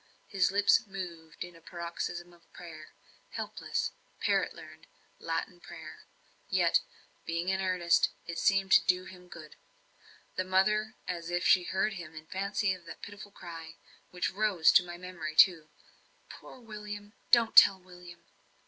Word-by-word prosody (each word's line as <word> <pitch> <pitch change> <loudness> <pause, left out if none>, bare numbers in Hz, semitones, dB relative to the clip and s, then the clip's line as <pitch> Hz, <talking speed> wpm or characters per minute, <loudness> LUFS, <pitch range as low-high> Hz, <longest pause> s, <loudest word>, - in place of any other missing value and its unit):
His 190 -3 +1
lips 205 +4 +3
moved 170 -5 -7
in 175 -1 -11
a 165 - -16
paroxysm 175 +1 -6
of 170 -1 -24
prayer 155 -3 -11 0.3
helpless, - - -3 0.3
parrot - - +1
learnt, - - -13 0.3
Latin - - -3
prayer; - - -11 0.4
yet, - - +3 0.4
being 170 +2 -2
in 190 0 0
earnest, 180 -2 +2 0.2
it 170 0 -5
seemed 195 -1 +2
to - - +8
do 180 0 +1
him 180 -1 -13
good. 160 -3 -12 0.8
The 185 - +1
mother, 210 +4 +1
as 170 -2 -4
if 175 +1 -1
she 180 -2 +5
heard 195 +4 0
in 160 -4 -9
fancy 195 +2 -1
that 175 -2 -12
pitiful 205 0 -9
cry, 165 -4 -10 0.3
which 180 -1 -2
rose 195 -5 +3
to - - +6
my 175 -1 -8
memory 175 -4 -6
too 160 -3 +5 0.6
"Poor - - -13
William! 210 -2 -8 0.2
don't 235 -2 +4
tell 195 -1 +9
William!" 180 -1 -14
180 Hz, 145 wpm, -30 LUFS, 170-195 Hz, 0.8 s, tell